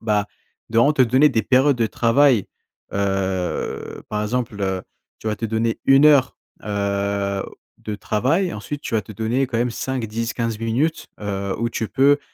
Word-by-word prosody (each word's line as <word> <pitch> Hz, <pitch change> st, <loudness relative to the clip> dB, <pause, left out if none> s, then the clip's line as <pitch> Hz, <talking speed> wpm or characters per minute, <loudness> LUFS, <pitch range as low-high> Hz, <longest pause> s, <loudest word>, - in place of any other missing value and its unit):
bah, 105 Hz, -2 st, 0 dB, 0.4 s
de 115 Hz, -, +2 dB
vraiment 140 Hz, +6 st, +5 dB
te 135 Hz, -, +5 dB
donner 130 Hz, +5 st, +5 dB
des 115 Hz, -5 st, 0 dB
périodes 135 Hz, +4 st, +3 dB
de 115 Hz, -2 st, +1 dB
travail 115 Hz, 0 st, +3 dB, 0.5 s
heu, 95 Hz, -2 st, -2 dB
par 105 Hz, 0 st, -2 dB
exemple, 115 Hz, -1 st, -2 dB
heu, 95 Hz, -1 st, -1 dB, 0.4 s
tu -, -, -10 dB
vas 110 Hz, -, +1 dB
te 115 Hz, -, -5 dB
donner 115 Hz, +1 st, 0 dB
1 135 Hz, +2 st, +7 dB
heure, 140 Hz, -4 st, +4 dB, 0.3 s
heu, 100 Hz, -1 st, -1 dB, 0.4 s
de 105 Hz, -, -5 dB
travail 155 Hz, -, 0 dB
ensuite 140 Hz, +8 st, -6 dB
tu -, -, -5 dB
vas 110 Hz, -, +2 dB
te 110 Hz, -, -11 dB
donner 115 Hz, +6 st, 0 dB
quand 120 Hz, -2 st, -2 dB
même 120 Hz, +1 st, +1 dB
5-10-15 115 Hz, -2 st, -3 dB
minutes, 120 Hz, +8 st, -1 dB
heu 100 Hz, -1 st, -3 dB
où 115 Hz, +1 st, 0 dB
tu 115 Hz, -1 st, -3 dB
peux, 140 Hz, +2 st, +4 dB
115 Hz, 170 wpm, -21 LUFS, 105-130 Hz, 0.5 s, 1